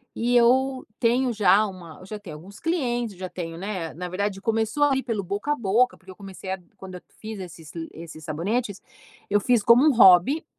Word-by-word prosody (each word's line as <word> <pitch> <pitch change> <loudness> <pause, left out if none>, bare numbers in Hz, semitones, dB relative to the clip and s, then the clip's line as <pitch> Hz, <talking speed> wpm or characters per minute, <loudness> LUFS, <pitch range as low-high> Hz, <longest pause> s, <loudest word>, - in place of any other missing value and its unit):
e 240 +1 0
eu 260 +2 +3 0.2
tenho 245 +2 +2
já 205 -1 +4
uma 175 -5 -11
eu 185 - -13
já 215 - -6
tenho 180 -7 -10
alguns 195 +7 -14
clientes, 240 - -1
já 185 0 -6
tenho, 165 -2 -6
né, 185 -5 -4
na 180 +2 -6
verdade 195 +1 -3
começou 225 +5 +1
ali, 265 -2 +1
pelo 220 -5 -3
boca 205 +10 -3
a - - +2
boca, 235 +2 +1
porque 190 0 -20
eu 185 - -10
comecei 195 -1 -10
a 190 - -3 0.2
quando 185 -1 -10
eu 180 - -9 0.2
fiz 220 -1 -7
esses 165 -4 -10
li 165 -1 -5
esses 160 -1 -10
sabonetes, 195 +7 -3 0.5
eu 205 0 +3
fiz 240 +1 +2
como 235 +5 +6
um 305 - +6
hobby. 220 - +6
205 Hz, 210 wpm, -24 LUFS, 180-240 Hz, 0.5 s, como